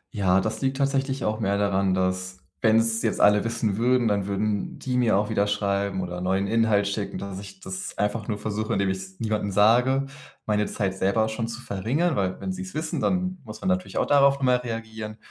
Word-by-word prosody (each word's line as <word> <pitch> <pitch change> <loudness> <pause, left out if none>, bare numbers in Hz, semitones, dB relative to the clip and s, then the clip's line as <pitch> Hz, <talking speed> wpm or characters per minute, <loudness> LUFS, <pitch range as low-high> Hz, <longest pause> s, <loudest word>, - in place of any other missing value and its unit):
Ja, 95 -2 +3
das 110 +6 -3
liegt 135 0 0
tatsächlich 135 -1 0
auch 110 0 -1
mehr 100 +1 +1
daran, 100 -2 +1
dass 95 0 -1 0.2
wenn 110 -1 +4
es 115 0 +2
jetzt 115 - -1
alle 105 0 +5
wissen 115 -3 -1
würden, 120 +1 +2
dann 100 -2 0
würden 100 0 -2
die 125 -1 -3
mir 120 -5 +3
auch 105 +1 0
wieder 100 - +2
schreiben 100 -1 -1
oder 90 0 -5
neuen 95 +2 0
Inhalt 110 -3 +2
schicken, 100 -1 -3
dass 100 -1 -6
ich 100 -1 -10
das 95 0 -6
einfach 105 +1 -1
nur 105 - -1
versuche, 110 +1 -3
indem 100 -1 +1
ich 95 - -2
es 95 0 -10
niemandem 105 -2 -1
sage, 120 +7 +4 0.4
meine 105 -1 +1
Zeit 95 -2 -2
selber 100 +4 +1
schon 115 +1 -3
zu 115 0 -6
verringern. 130 - -1
Weil 95 -5 -1
wenn 190 - -3
sie 185 - -6
es 185 -1 -7
wissen, 155 +1 -2
dann 185 0 0
muss 110 -1 -9
man - - -4
natürlich 185 0 -1
auch - - +2
darauf 140 -1 +5
nochmal 130 -2 +2
reagieren 110 -2 -6
110 Hz, 215 wpm, -25 LUFS, 100-120 Hz, 0.4 s, alle